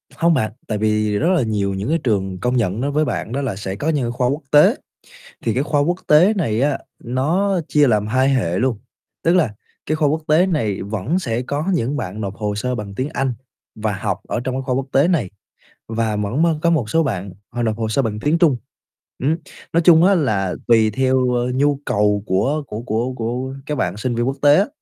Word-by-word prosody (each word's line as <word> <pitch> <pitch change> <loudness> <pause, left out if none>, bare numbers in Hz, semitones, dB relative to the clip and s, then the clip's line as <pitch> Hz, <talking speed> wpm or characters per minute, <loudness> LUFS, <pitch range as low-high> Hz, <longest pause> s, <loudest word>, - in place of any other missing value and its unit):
Không 170 0 +3
bạn, 110 -8 0 0.2
tại 110 - -1
vì 105 -1 +1
rất 155 - +1
là 180 -5 +3
nhiều 100 -3 -1
những 100 +7 -3
cái 165 - +2
trường 95 -5 -1
công 125 +4 0
nhận 105 0 0
đối 140 +2 -1
với 150 +1 +1
bạn 120 - -3
đó 135 +3 -2
là 125 -8 -2
sẽ 95 -1 -5
có 145 +10 -2
những 135 -7 0
khoa 125 +1 0
quốc 140 +5 -1
tế, 150 0 +6 0.7
thì 115 - +1
cái 130 - +1
khoa 145 -1 +1
quốc 175 +5 +1
tế 175 +8 +5
này 120 - 0
á 140 +1 +1 0.3
nó 170 +11 +1
chia 150 -1 +4
làm 105 -4 +2
hai 130 +4 +2
hệ 90 -8 0
luôn, 120 -3 0 0.5
tức 170 - +4
là 150 - +1 0.3
cái 155 - 0
khoa 155 -2 +2
quốc 155 +2 -1
tế 160 +5 +4
này 115 - -1
vẫn 110 - -2
sẽ 120 -8 -2
có 145 +4 -3
những 140 -1 -1
bạn 105 -4 -5
nộp 100 -2 -4
hồ 105 0 -3
sơ 125 +5 -2
bằng 100 -3 -6
tiếng 130 +7 -2
Anh 135 -2 0 0.4
và 110 -1 -2
học 95 - -3
ở - - -1
trong 130 - -2
cái 135 - -2
khoa 130 -1 -1
quốc 135 0 -1
tế 140 +5 +4
này, 145 - 0 0.6
và 115 -1 -1
vẫn 105 +8 -1
mới 165 -1 +3
có 170 - +3
một 135 -10 0
số 165 - +3
bạn 100 - -3 0.2
họ 120 - -2
nộp 110 -2 0
hồ 110 -1 -2
sơ 125 +5 +1
bằng 110 -3 -2
tiếng 155 +5 +1
Trung, 155 -7 +4 0.7
ừm. 150 +5 +2 0.4
Nói 170 - +3
chung 165 -1 +7
á 200 +2 +5
là 105 - 0
tùy 110 -2 +4
theo, 130 +2 +1
ơ, 120 0 0
nhu 140 +1 +2
cầu 105 -3 +1
của 135 +12 +1
của 105 - -6
của 120 +2 -1
của 125 +3 -3
các 150 - -2
bạn 90 -9 -1
sinh 120 +3 -2
viên 120 +1 0
quốc 135 - -2
tế 145 0 +6
á, 200 - +3
125 Hz, 235 wpm, -20 LUFS, 105-150 Hz, 0.7 s, chung